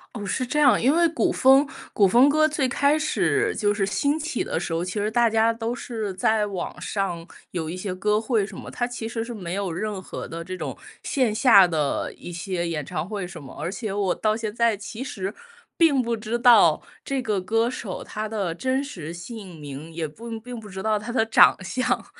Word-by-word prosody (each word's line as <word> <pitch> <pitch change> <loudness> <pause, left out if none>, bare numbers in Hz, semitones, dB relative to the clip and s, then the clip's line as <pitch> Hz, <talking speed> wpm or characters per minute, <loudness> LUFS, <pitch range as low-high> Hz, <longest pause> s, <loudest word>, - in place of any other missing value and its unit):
哦， 210 - -5
是 250 +6 -1
这 300 +5 -1
样。 280 -4 +5
因 270 +6 +3
为 340 0 +5
古 335 - +1
风 270 +2 +5 0.2
古 200 -2 +4
风 245 +8 +6
歌 310 +1 +4
最 295 -4 0
开 285 +4 +2
始 415 +7 +1
就 205 -2 +1
是 205 - -1
兴 245 +10 +1
起 310 -5 -2
的 - - -2
时 175 - -4
候， 165 +2 -1
其 180 - -4
实 210 0 -1
大 235 +1 +3
家 225 +1 +3
都 230 +1 -3
是 220 -5 -4
在 210 +3 +2
网 185 -3 -5
上 180 -3 -3 0.2
有 165 -3 -4
一 165 - -4
些 185 0 -4
歌 210 +3 +1
会 225 -3 +1
什 195 -2 -10
么， - - -8
它 240 - -2
其 240 -2 -5
实 225 -1 -3
是 240 - -6
没 185 -4 -5
有 195 -4 -2
任 205 +2 -3
何 185 - -7
的 165 0 -6
这 185 +2 -6
种 - - -5 0.2
线 255 -6 +1
下 215 -5 +7
的 155 -4 -1
一 175 - -10
些 175 0 -3
演 150 -4 -3
唱 155 +6 -4
会 200 -4 -4
什 175 -3 -10
么。 135 - -11
而 165 +4 -3
且 215 0 -4
我 195 -2 0
到 215 0 0
现 220 -2 -4
在 230 -2 +2
其 215 +4 -7
实 195 -6 -4 0.4
并 320 -5 +4
不 235 -2 0
知 225 +2 -3
道 225 -10 +6 0.2
这 275 -1 -2
个 210 -4 0
歌 225 +5 +1
手 235 -6 -5
他 215 +1 -4
的 200 -6 -2
真 260 +8 -1
实 170 - -7
姓 180 -1 -9
名， 145 +2 -8
也 160 -1 -3
不 225 +8 -8
并 245 +1 -8
不 210 - -11
知 190 0 -6
道 215 -1 +1
他 215 +4 -6
的 225 -2 +2
长 225 - +6
相。 255 +7 -1
215 Hz, 245 characters per minute, -24 LUFS, 185-240 Hz, 0.4 s, 下